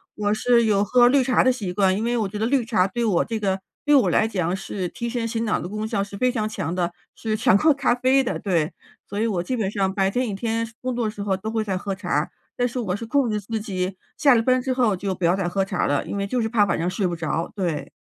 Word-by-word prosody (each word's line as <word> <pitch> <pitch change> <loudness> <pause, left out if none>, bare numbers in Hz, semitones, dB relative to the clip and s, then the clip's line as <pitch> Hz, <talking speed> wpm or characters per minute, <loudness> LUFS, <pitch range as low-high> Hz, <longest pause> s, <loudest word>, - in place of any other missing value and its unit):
我 205 0 0
是 235 +1 +3
有 205 -2 +3
喝 240 +4 +5
绿 265 +1 +4
茶 255 0 +3
的 255 - +4
习 215 -8 -4
惯， 190 0 +2
因 215 - -2
为 240 +1 0
我 215 -3 0
觉 210 - -6
得 220 - 0
绿 260 +1 +2
茶 215 -5 +2
对 235 +5 -3
我 195 -6 +2
这 225 -1 -3
个 195 -2 0 0.3
对 295 - +4
我 265 - +4
来 220 - +3
讲 185 -5 -1
是 190 -1 -4
提 235 +5 -5
神 235 -1 -2
醒 230 0 -2
脑 215 - +1
的 - - -5
功 215 +3 -4
效 210 -3 -1
是 200 0 -9
非 250 +4 +2
常 220 -4 -1
强 170 -7 -3
的。 175 -1 0 0.2
是 220 -1 -2
强 230 -1 +4
过 310 +8 +4
咖 275 -3 +1
啡 260 +2 +3
的， 240 - -2
对。 170 -4 0 0.3
所 205 - -4
以 225 - +1
我 185 -6 -1
基 255 - -2
本 210 -4 0
上 195 -2 -1
白 195 -1 +1
天 250 +5 -1
一 - - -3
天 225 +3 -1 0.2
工 255 -1 -2
作 240 -1 -1
的 215 - -1
时 205 - -8
候 200 -1 0
都 215 +3 -5
会 225 -1 0
在 195 -3 -2
喝 195 +1 -3
茶。 175 -6 -1 0.3
但 245 - +2
是 245 - -6
我 190 -6 -1
是 230 - -6
控 280 +1 +2
制 210 -1 -1
自 220 +3 -3
己 190 -3 -3 0.2
下 280 -4 +5
了 230 - +3
班 255 +1 +3
之 260 +1 -2
后 240 -6 +2
就 190 +1 -3
不 180 - -2
要 170 +2 +4
再 195 -2 -1
喝 195 +2 0
茶 190 -2 -1
了， 145 0 0
因 - - -5
为 200 0 -1
就 250 +5 -1
是 220 - 0
怕 215 -2 +3
晚 175 - 0
上 170 - -1
睡 185 +1 -1
不 175 - -2
着， 165 0 -2
对。 175 -7 -2
210 Hz, 315 characters per minute, -23 LUFS, 190-235 Hz, 0.3 s, 喝